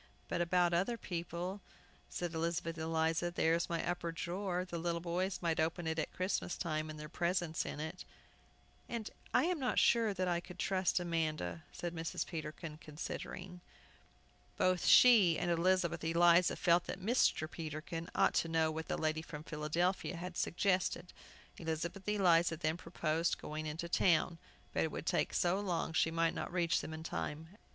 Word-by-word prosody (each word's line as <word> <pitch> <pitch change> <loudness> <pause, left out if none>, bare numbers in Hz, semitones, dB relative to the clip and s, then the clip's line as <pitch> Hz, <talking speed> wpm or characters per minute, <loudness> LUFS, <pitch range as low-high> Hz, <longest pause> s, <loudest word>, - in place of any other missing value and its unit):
"But - - 0
about 175 0 +3
other 195 +8 +1
people," 175 +1 -4 0.5
said 175 -1 -3
Elizabeth 165 0 -1
Eliza; 160 +1 0
"there 165 -2 +2
is 170 0 0
my 170 -1 -1
upper 175 -1 -2
drawer; 180 +2 -2
the 170 -2 -5
little 170 0 -1
boys 180 +3 -1
might 165 -1 +1
open 165 +2 0
it 160 0 -1
at - - -2
Christmas 185 -1 -2
time, 155 -2 -2
and 155 0 -7
their 150 - -6
presents 175 0 -1
in - - -5
it!" 160 +4 -5 0.9
"And 230 -2 -4 0.2
I - - +4
am 350 -1 0
not 255 -2 0
sure 230 -2 +4
that 185 0 0
I 175 -1 +1
could 180 +1 -11
trust 185 -1 +1
Amanda," 155 - -2
said 175 -1 -5
Mrs. 165 -1 -3
Peterkin, 155 -1 -6
considering. 175 +4 -7 1.0
Both 185 -1 +2
she 210 -10 +7
and 175 - 0
Elizabeth 170 0 +2
Eliza 170 +2 +5
felt 175 -1 +3
that - - -5
Mr. 200 -6 +2
Peterkin 160 +1 -5
ought - - +4
to - - +1
know 160 -1 +2
what 160 +1 -5
the - - -1
lady 155 0 0
from 150 -1 -8
Philadelphia 165 +5 -1
had 175 +1 -6
suggested. 180 -1 0 0.5
Elizabeth 170 +5 -3
Eliza 175 -5 +4
then 155 -1 0
proposed 165 -1 -1
going 155 +1 -5
into 160 +3 -4
town, 170 -1 +2 0.3
but - - +1
it - - 0
would - - -5
take - - +1
so 180 +2 +2
long 175 -5 -1
she 160 - +3
might 165 0 +1
not - - -4
reach 170 -2 +1
them - - -6
in 160 0 -6
time. 160 -1 -4
170 Hz, 170 wpm, -35 LUFS, 160-180 Hz, 1.0 s, she